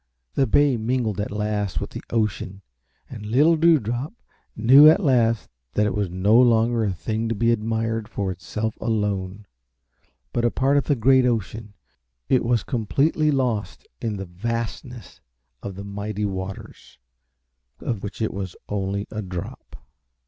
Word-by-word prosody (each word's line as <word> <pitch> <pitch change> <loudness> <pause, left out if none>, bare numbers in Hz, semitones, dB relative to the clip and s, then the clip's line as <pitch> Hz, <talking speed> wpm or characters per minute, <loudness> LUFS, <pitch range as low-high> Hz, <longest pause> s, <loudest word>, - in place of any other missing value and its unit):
The 135 - +2
bay 140 +2 +3
mingled 110 -3 -1
at 105 - -3
last 105 -2 -2
with - - -5
the - - -7
ocean 100 -3 -2 0.4
and 115 -4 -9
little 140 +10 +4
Dewdrop 150 - +1 0.4
knew 135 +7 +8
at 180 +6 +3
last 115 -5 +2 0.3
that 105 - +2
it 105 - 0
was 100 -3 -1
no 95 +5 +2
longer 115 -1 +3
a 100 - 0
thing 110 +5 -3
to 115 - -1
be 115 +2 +2
admired 115 0 -1
for 100 -3 -2
itself 105 +5 -4
alone, 105 -3 -2 0.9
but 120 - 0
a 120 - +4
part 135 +4 +1
of 140 - +1
the 145 - +2
great 130 +1 +4
ocean. 110 -2 -3 0.5
It 130 - +3
was 120 -2 +1
completely 140 - +1
lost 125 -7 -1
in 110 -3 -2
the 95 - -5
vastness 115 +6 -5 0.4
of 100 -2 -6
the 100 +1 -7
mighty 105 +1 -4
waters 95 -6 -7 0.8
of 115 -5 -3
which 105 +2 -5
it 110 - -1
was 95 -2 -5
only 100 0 -2
a 110 - -4
drop. 90 -3 -7
110 Hz, 155 wpm, -23 LUFS, 100-120 Hz, 0.9 s, knew